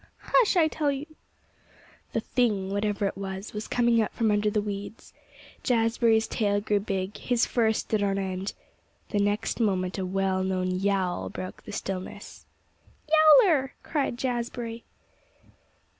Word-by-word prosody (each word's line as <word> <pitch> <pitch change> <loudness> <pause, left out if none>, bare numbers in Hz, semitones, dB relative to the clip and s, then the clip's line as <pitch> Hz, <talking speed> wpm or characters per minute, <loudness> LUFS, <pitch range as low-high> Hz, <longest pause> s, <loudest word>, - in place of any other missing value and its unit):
"Hush, 460 -5 +4
I 325 -2 +5
tell 300 -2 0
you!" 275 +1 -4 1.1
The 225 - 0
thing, 210 -6 0
whatever 205 0 0
it 195 - -1
was, 195 +1 -6
was 210 0 -5
coming 235 -1 +3
out 215 - -1
from 225 -2 +1
the 210 0 +2
weeds. 205 +1 -6 0.5
Jazbury's 230 -1 +2
tail 205 -2 +1
grew 205 0 +1
big. 195 -1 -3
His 245 -2 +1
fur 225 -3 +2
stood 215 -1 -1
on 195 -1 +1
end. 190 0 -3 0.6
The 205 - 0
next 205 +3 0
moment 190 -4 0
a 190 - -1
well 190 0 0
known 185 -1 -1
yowl 185 -1 0
broke 185 - -7
the - - -7
stillness. 190 -1 -6 1.0
"Yowler!" 285 -9 +1
cried 280 -6 -1
Jazbury. 240 -2 -3
210 Hz, 140 wpm, -27 LUFS, 195-235 Hz, 1.1 s, I